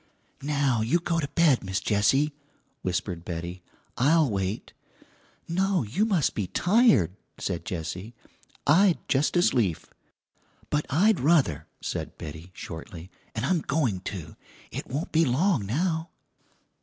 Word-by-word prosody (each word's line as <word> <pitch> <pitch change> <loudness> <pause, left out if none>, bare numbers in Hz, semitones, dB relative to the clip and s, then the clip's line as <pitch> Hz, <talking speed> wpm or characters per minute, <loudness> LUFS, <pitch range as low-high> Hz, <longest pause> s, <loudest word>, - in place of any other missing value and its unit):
"Now 140 -5 +1
you 120 +10 +2
go 170 -1 -1
to 145 - -1
bed, 155 -9 +4
Miss 95 0 -1
Jessie," 135 +8 +2 0.5
whispered 90 -1 -2
Betty. 85 +1 -5 0.4
"I'll 155 +4 +4
wait." 95 +1 -3 0.7
"No, 185 0 +1
you 125 - 0
must 190 -10 +2
be 100 -4 -2
tired," 175 - +3 0.2
said 85 - -3
Jessie. 90 +3 -5 0.5
"I'd 175 +4 +5
just 145 +6 +2
as 175 - +4
lief." 100 -10 +1 0.9
"But 150 0 0
I'd 190 +7 +4
ruther," 130 - +2
said - - -4
Betty 80 +3 -8
shortly 85 +2 -8 0.2
"'n' 110 - -2
I'm 170 +1 +2
going 130 - 0
to; 90 -6 -7 0.4
it - - -5
won't 145 +6 -3
be 165 +1 +4
long 135 - +2
now." 160 - 0
130 Hz, 130 wpm, -27 LUFS, -, 0.9 s, I'd